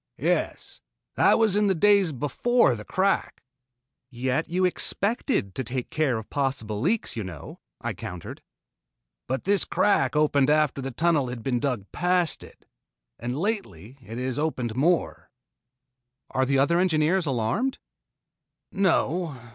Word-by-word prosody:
"Yes, - - -2 0.3
that - - +4
was 220 -4 +2
in 210 0 +3
the 190 - +2
days 200 -1 +4
before 145 - +2
the 105 - -8
crack." 190 - -1 0.7
"Yet 130 +4 -2
you 185 +2 +1
expected 200 - 0
to 130 - -3
take 125 +1 -4
care 145 -6 +1
of 110 - -7
possible 125 -7 -2
leaks, 210 - 0
you 110 - -3
know," 85 -6 -9 0.2
I - - -3
countered. 90 -1 -8 0.9
"But 130 -1 -2
this 200 +1 +3
crack 150 -10 +1
opened 145 -2 +3
after 150 -2 +2
the 135 - -4
tunnel 150 +1 +1
had 120 -2 -6
been 125 -3 0
dug 125 -7 -2
past 180 -2 +1
it, - - -16 0.5
and 120 +3 -3
lately 140 - -3
it 115 -1 -9
has 130 +1 -2
opened 125 -7 -2
more." 165 +6 0 1.0
"Are 130 0 +1
the 135 0 +2
other 165 +6 +3
engineers 170 0 +2
alarmed?" 135 - 0 0.9
"No. 175 -5 +1
145 Hz, 140 wpm, -25 LUFS, 125-180 Hz, 1.0 s, that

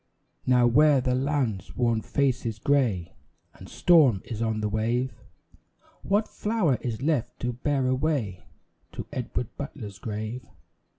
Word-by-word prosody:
Now 125 -1 +5
where 145 +4 +5
the 125 0 0
land's 130 - -1
worn 115 -2 +2
face 135 0 0
is 115 -3 -3
grey 115 -9 +1 0.4
And - - -13
storm 145 - +4
is 115 -2 -5
on 110 -1 0
the 105 - 0
wave, 115 +5 0 0.9
What 205 +2 +1
flower 210 - 0
is 120 0 -4
left 140 -6 0
to 120 0 -1
bear 135 +2 0
away 130 - 0 0.5
To - - -5
Edward 125 -1 -4
Butler's 110 -8 -7
grave? 110 +3 -5
125 Hz, 135 wpm, -26 LUFS, 110-140 Hz, 0.9 s, Now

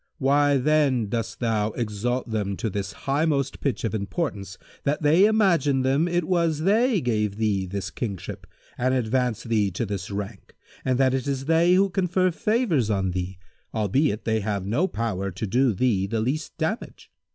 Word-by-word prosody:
Why 145 0 +3
then 135 -5 +2
dost 115 0 -3
thou 110 -3 0
exalt 120 +2 -2
them 100 -3 -2
to 110 -3 -2
this 100 0 -3
highmost 140 -1 0
pitch 140 - -2
of 115 - -1
importance 100 - -3 0.3
that 150 +2 -1
they 160 +7 +5
imagine 170 -11 +3
them 135 +6 +2
it 175 0 0
was 165 -3 +1
they 215 +3 +3
gave 105 -5 0
thee 105 -3 0
this 100 +1 -4
kingship 100 -7 -5 0.3
and 130 +1 +2
advanced 125 -1 0
thee 110 -3 +2
to 95 +6 -3
this 100 -3 -4
rank 100 0 -6 0.3
and 130 -1 +1
that 130 -1 +3
it 135 +1 -1
is 135 -1 -2
they 165 +3 +4
who 195 +1 +3
confer 185 0 +1
favours 180 - +1
on 95 -3 0
thee, 90 +1 -4 0.4
albeit 110 +3 +1
they 110 -1 +1
have 100 -2 -2
no 140 - +1
power 100 - -2
to 95 +4 -4
do 125 +5 +2
thee 100 -2 +1
the 115 +2 -1
least 140 +7 -2
damage? 170 +8 -4
125 Hz, 175 wpm, -25 LUFS, 105-155 Hz, 0.4 s, they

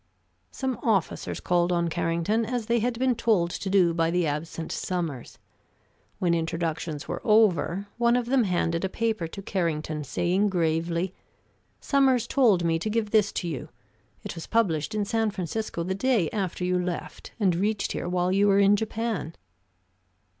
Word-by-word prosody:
Some 260 -3 -3
officers 200 -7 0
called 175 0 +1
on 170 -1 +1
Carrington, 170 +7 0
as 235 0 -2
they 235 +1 +2
had 235 +1 -1
been 255 +1 +2
told 215 -7 +1
to 195 - -4
do 185 -3 +4
by 165 0 +1
the 175 0 +1
absent 160 +2 -4
Sommers. 165 -9 -4 0.8
When 175 -2 +1
introductions 165 -2 -2
were - - -4
over, 200 -3 +3
one 235 0 +4
of 245 -1 +1
them 250 -1 +2
handed 170 -2 0
a 190 - 0
paper 220 -4 -1
to 195 +4 -9
Carrington, 155 -5 -2
saying 180 +8 +1
gravely: 170 0 0 0.7
"Sommers 265 -4 +2
told 230 -10 +3
me 165 -1 +1
to 215 - -2
give 215 -1 -1
this 215 -2 +3
to 175 - -2
you. 155 -6 -5 0.5
It - - -5
was 165 -2 -8
published 200 -4 +1
in 210 -1 0
San 225 +1 +1
Francisco 195 -1 -3
the 185 +2 -2
day 205 - +1
after 190 -3 -3
you 180 0 +1
left, 180 -2 -5
and 190 -5 +2
reached 205 +3 0
here 175 - -3
while 180 0 +1
you 200 +2 +3
were 200 -1 +4
in 200 0 +5
Japan." 220 -6 -3
185 Hz, 170 wpm, -26 LUFS, 170-220 Hz, 0.8 s, in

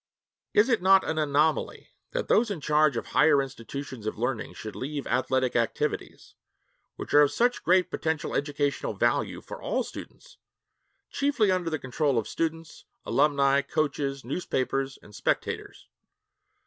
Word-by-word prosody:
Is 210 - +5
it 230 -7 +2
not 190 +1 +5
an 160 0 -1
anomaly 150 +1 0 0.2
that - - -3
those 230 +1 +3
in 200 -5 -3
charge 150 0 +2
of - - -3
higher 150 -1 +4
institutions 130 -2 -6
of 110 - -3
learning 120 +1 -3
should 110 -2 -8
leave 140 +1 -4
athletic 130 +1 0
activities, 115 -2 -2 0.6
which - - -7
are 145 - +8
of 145 -1 +4
such 245 +10 +1
great 180 +1 +3
potential 160 -1 -2
educational 145 0 -1
value - - 0
for - - -9
all - - -1
students, - - -11 0.7
chiefly 275 -8 +2
under 180 -2 0
the 155 - -1
control 140 0 -1
of 110 - -1
students, 165 0 -4 0.2
alumni, 140 -1 +3
coaches, 140 -3 -2
newspapers, 135 -2 -2
and 105 - -16
spectators? - - -3
145 Hz, 145 wpm, -27 LUFS, 135-165 Hz, 0.7 s, are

